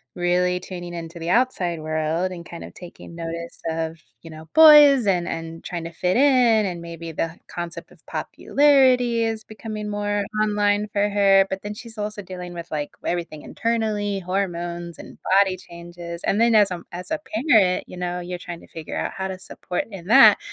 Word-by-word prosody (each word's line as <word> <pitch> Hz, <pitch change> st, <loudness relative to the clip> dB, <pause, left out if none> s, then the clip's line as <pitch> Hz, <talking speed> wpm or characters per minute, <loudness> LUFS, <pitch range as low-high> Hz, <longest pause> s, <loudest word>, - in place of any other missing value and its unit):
really 180 Hz, 0 st, +1 dB
tuning 175 Hz, -1 st, -8 dB
into 170 Hz, 0 st, -7 dB
the 165 Hz, +1 st, -4 dB
outside 185 Hz, -8 st, +1 dB
world 155 Hz, +3 st, -1 dB
and 170 Hz, -2 st, -8 dB
kind 170 Hz, -, -9 dB
of -, -, -10 dB
taking 170 Hz, -1 st, -12 dB
notice 170 Hz, 0 st, -6 dB
of, 160 Hz, 0 st, -3 dB, 0.2 s
you 165 Hz, -, -12 dB
know, 155 Hz, +1 st, -11 dB
boys 295 Hz, -7 st, +8 dB
and 175 Hz, -3 st, +1 dB
and 165 Hz, 0 st, -6 dB
trying 170 Hz, -2 st, -5 dB
to 170 Hz, -, -6 dB
fit 180 Hz, +5 st, 0 dB
in, 250 Hz, -6 st, +4 dB
and 175 Hz, -2 st, -4 dB
maybe 170 Hz, -1 st, -8 dB
the 165 Hz, +1 st, -3 dB
concept 175 Hz, -1 st, -7 dB
of -, -, -21 dB
popularity 255 Hz, -5 st, +3 dB
is 220 Hz, -1 st, -3 dB
becoming 215 Hz, -1 st, -7 dB
more 205 Hz, 0 st, -1 dB, 0.2 s
online 205 Hz, 0 st, +1 dB
for 205 Hz, 0 st, +2 dB
her, 195 Hz, -1 st, +4 dB
but 190 Hz, 0 st, -4 dB
then 205 Hz, 0 st, -5 dB
she's 230 Hz, -1 st, -10 dB
also 210 Hz, 0 st, -4 dB
dealing 180 Hz, -1 st, -8 dB
with, 170 Hz, 0 st, -7 dB
like, 150 Hz, -1 st, -2 dB, 0.2 s
everything 170 Hz, -3 st, -3 dB
internally, 215 Hz, -3 st, -1 dB
hormones 175 Hz, -2 st, -3 dB
and -, -, -12 dB, 0.2 s
body 190 Hz, -2 st, +3 dB
changes. 170 Hz, 0 st, -9 dB
And 210 Hz, +3 st, +1 dB
then 235 Hz, -1 st, +4 dB
as, 205 Hz, -3 st, +5 dB
um, 175 Hz, -1 st, -6 dB
as 180 Hz, -, -8 dB
a 315 Hz, -, 0 dB, 0.3 s
parent, 190 Hz, -7 st, +4 dB
you 180 Hz, -, -10 dB
know, 180 Hz, 0 st, -3 dB
you're 180 Hz, 0 st, -6 dB
trying 175 Hz, -1 st, -8 dB
to -, -, -16 dB
figure 160 Hz, -1 st, -7 dB
out -, -, -2 dB
how 190 Hz, 0 st, -3 dB
to 185 Hz, -, -5 dB
support 180 Hz, -1 st, -5 dB
in 185 Hz, -2 st, -9 dB
that. 270 Hz, -, +8 dB
180 Hz, 190 wpm, -23 LUFS, 170-210 Hz, 0.3 s, boys